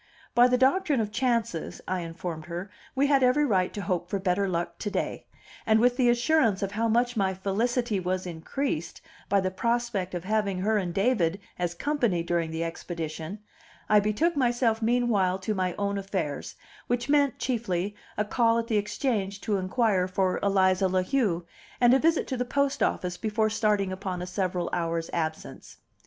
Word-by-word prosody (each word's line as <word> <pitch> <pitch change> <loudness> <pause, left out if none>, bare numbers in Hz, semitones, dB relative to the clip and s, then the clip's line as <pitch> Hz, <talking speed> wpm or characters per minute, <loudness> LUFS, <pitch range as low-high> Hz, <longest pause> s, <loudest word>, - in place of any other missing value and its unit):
By 240 +1 +6
the 250 0 +2
doctrine 275 +2 +3
of 210 -2 -1
chances, 230 -9 -1
I 185 0 -1
informed 165 -1 -6
her, 175 +3 -6 0.2
we 270 +1 +3
had 280 -1 +4
every 260 +4 +4
right 185 -7 +1
to 205 - -4
hope 180 -3 -2
for 200 - 0
better 190 +1 0
luck 170 -1 -3
to 210 - -2
day; - - -3 0.4
and, 220 0 +4
with 245 +1 +4
the 245 -1 +3
assurance 240 -4 +2
of 195 - -2
how 225 +2 0
much 240 +2 +2
my 190 -3 +1
felicity 220 +3 0
was 185 +1 -2
increased 170 - -3 0.3
by 200 - +4
the 185 0 -1
prospect 230 -4 -1
of 175 - -4
having 205 -1 0
her 210 +3 +1
and 180 -3 -2
David 195 -3 +1 0.2
as 175 -1 -1
company 240 - 0
during 170 -1 0
the 160 +1 -3
expedition, 165 +2 -5 0.5
I 210 - +6
betook 215 +12 +1
myself 240 -4 +1
meanwhile 220 -6 +2
to 190 +3 -2
my 185 -3 -1
own 200 0 -1
affairs, 190 -7 -4 0.3
which 245 0 -1
meant 285 -2 +3
chiefly 210 -6 -2 0.2
a 210 - +1
call 230 +1 +2
at 230 - 0
the 225 -2 0
Exchange 205 -2 -1
to 210 -2 0
inquire 190 -1 +1
for 185 0 0
Eliza 190 -1 +3
La 185 0 +1
Heu, 185 -8 0 0.3
and 245 0 +6
a 265 - +5
visit 325 +2 +2
to 260 - -2
the 250 - 0
post 280 +2 0
office 180 -1 0
before 215 +1 0
starting 210 -3 +1
upon 185 -1 -4
a 180 - -4
several 185 -1 -2
hours' 165 -1 -1
absence. 160 -2 -4
200 Hz, 180 wpm, -27 LUFS, 185-240 Hz, 0.5 s, By